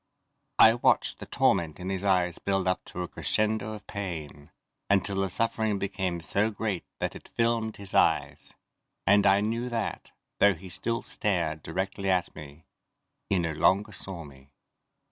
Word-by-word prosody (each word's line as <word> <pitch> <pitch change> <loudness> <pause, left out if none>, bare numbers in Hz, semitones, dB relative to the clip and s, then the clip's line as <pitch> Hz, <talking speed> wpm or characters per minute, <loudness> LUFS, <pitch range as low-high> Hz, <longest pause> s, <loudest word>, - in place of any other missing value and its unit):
I 110 - +8
watched 120 - +2
the - - -8
torment 80 -1 +1
in 90 +1 -5
his 95 0 -3
eyes 90 -3 +2
build 95 -1 0
up 90 - 0
to 90 - -5
a - - -4
crescendo 110 +3 -1
of 105 - -10
pain, 80 -8 -6 0.4
until 100 0 +2
the 95 0 0
suffering 110 +1 0
became 95 -3 -2
so 100 +6 +1
great 105 -4 -3
that - - -3
it - - -12
filmed 115 -1 0
his 100 -2 -7
eyes, - - +1 0.5
and 100 +1 +5
I 100 +1 +5
knew 115 +3 -1
that, 115 -2 -3 0.3
though 100 -2 +5
he 90 +3 -11
still 115 +6 -2
stared 85 -6 -1
directly 95 +4 -3
at 90 -2 +1
me, 75 +1 -11 0.6
he 100 - +2
no 85 -2 0
longer 100 +7 +2
saw 95 -3 -5
me. 70 -2 -15
95 Hz, 165 wpm, -28 LUFS, 90-105 Hz, 0.6 s, I